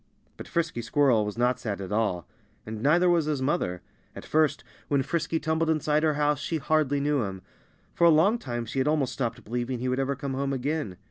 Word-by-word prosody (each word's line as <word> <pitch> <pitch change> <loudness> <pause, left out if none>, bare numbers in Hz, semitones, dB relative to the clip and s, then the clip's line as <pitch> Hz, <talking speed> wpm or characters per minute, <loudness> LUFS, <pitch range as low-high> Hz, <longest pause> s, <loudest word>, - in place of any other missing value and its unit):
But - - -9
Frisky 165 -7 -1
Squirrel 125 -2 +3
was 105 +1 -5
not 125 +1 +1
sad 105 -4 -4
at 95 0 -6
all. 105 -6 0 0.4
And 110 0 -6
neither 170 +7 +4
was 170 -3 +3
his 150 -2 -1
mother. 130 - -1 0.3
At - - -9
first, 155 -3 +1 0.2
when 140 -2 +1
Frisky 165 +1 -1
tumbled 160 +1 0
inside 155 -1 +1
her 155 -2 +2
house 150 -1 +1
she 160 +2 -2
hardly 150 -2 +1
knew 145 -1 +1
him. 95 -3 -5 0.5
For 170 - +3
a - - +8
long 180 +9 +4
time 120 - -4
she 120 +4 -3
had 130 - +1
almost 145 -4 +1
stopped 120 -3 -3
believing 120 +3 -3
he 125 +2 -3
would 130 +1 0
ever 135 +1 0
come 140 0 -4
home 135 +1 -1
again. 135 - -2
140 Hz, 215 wpm, -27 LUFS, 120-155 Hz, 0.5 s, a